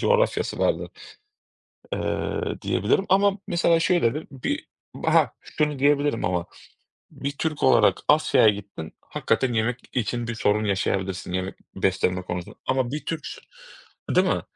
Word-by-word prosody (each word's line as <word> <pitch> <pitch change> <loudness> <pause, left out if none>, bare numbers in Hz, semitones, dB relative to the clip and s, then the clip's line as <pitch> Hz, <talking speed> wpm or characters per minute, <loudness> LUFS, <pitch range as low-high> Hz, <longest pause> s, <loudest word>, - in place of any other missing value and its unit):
coğrafyası 485 +1 +1
vardır, - - 0 1.0
eee, - - -2
diyebilirim 195 - +1
ama 195 +1 +4
mesela, 170 -1 +3
şöyledir 160 -5 +1
bir 135 -2 -3 0.4
ha, - - +4
şunu 150 -2 -2
diyebilirim 145 -2 +2
ama 90 -1 0 0.7
bir 140 - -4
Türk 155 -2 -2
olarak 130 - +5
Asya'ya 150 -6 +5
gittin, 100 -6 -3
hakikaten 130 -2 0
yemek 115 +2 0
için 120 0 -1
bir 115 - -2
sorun 105 -1 +1
yaşayabilirsin 95 -2 -1
yemek 95 +1 -2 0.2
beslenme 95 -1 +1
konusunda 90 -1 -6
ama 130 -2 +1
bir 150 -1 -4
Türksün, 160 0 -5 0.7
değil - - +4
mi? - - +1
120 Hz, 130 wpm, -24 LUFS, 95-150 Hz, 1.0 s, olarak